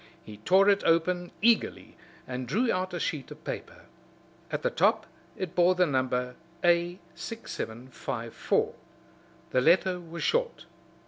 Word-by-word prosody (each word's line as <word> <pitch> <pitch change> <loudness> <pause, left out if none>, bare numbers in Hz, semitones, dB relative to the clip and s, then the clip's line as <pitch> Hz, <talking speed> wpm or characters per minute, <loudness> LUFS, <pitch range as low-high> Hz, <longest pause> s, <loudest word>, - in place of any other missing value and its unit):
He 105 -1 -10
tore 190 - +4
it 200 -1 +4
open 175 +2 +2
eagerly 230 -1 +2 0.3
and 125 0 -4
drew 230 - +1
out 185 0 -1
a 175 - -4
sheet 150 -5 -3
of 150 +1 -12
paper. - - -7 0.6
At - - -3
the - - +1
top - - +2 0.3
it 185 -5 -4
bore 180 +1 +4
the 180 0 +4
number 125 -3 -1 0.3
A6754. 170 - -2 0.8
The 130 - +3
letter 180 +4 +4
was 170 0 -7
short. 485 0 0
175 Hz, 130 wpm, -28 LUFS, 130-185 Hz, 0.8 s, tore